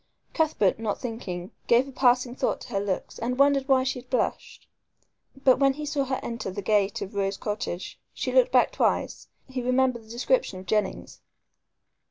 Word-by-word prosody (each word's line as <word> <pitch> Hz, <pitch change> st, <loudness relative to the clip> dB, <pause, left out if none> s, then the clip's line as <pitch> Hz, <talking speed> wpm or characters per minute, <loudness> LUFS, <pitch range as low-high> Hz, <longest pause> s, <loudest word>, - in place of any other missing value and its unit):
Cuthbert, 295 Hz, -, +2 dB
not 215 Hz, -3 st, -2 dB
thinking, 195 Hz, -7 st, -5 dB, 0.2 s
gave 240 Hz, +3 st, +4 dB
a -, -, -9 dB
passing 250 Hz, -1 st, +2 dB
thought -, -, -1 dB
to -, -, -10 dB
her 200 Hz, -4 st, -1 dB
looks 195 Hz, -2 st, -3 dB
and 245 Hz, +2 st, -2 dB
wondered 275 Hz, -1 st, +3 dB
why 265 Hz, -2 st, +4 dB
she 260 Hz, -1 st, -2 dB
had 250 Hz, 0 st, -16 dB
blushed. 255 Hz, -, -2 dB, 0.8 s
But 260 Hz, -2 st, +5 dB
when 275 Hz, -1 st, +4 dB
he 300 Hz, +2 st, -6 dB
saw 285 Hz, -2 st, -1 dB
her 260 Hz, 0 st, -2 dB
enter 230 Hz, -4 st, -4 dB
the 195 Hz, +2 st, -5 dB
gate 205 Hz, -1 st, +1 dB
of 195 Hz, -, -9 dB
Rose 195 Hz, -1 st, -1 dB
Cottage 205 Hz, -4 st, -4 dB
she -, -, -3 dB
looked -, -, +4 dB
back -, -, +4 dB
twice -, -, 0 dB, 0.2 s
he 260 Hz, -2 st, -4 dB
recalled 255 Hz, +1 st, +2 dB
the 235 Hz, -, -7 dB
description 240 Hz, -, 0 dB
of 185 Hz, -, -11 dB
Jennings. 210 Hz, +3 st, -2 dB
245 Hz, 185 wpm, -26 LUFS, 205-265 Hz, 0.8 s, But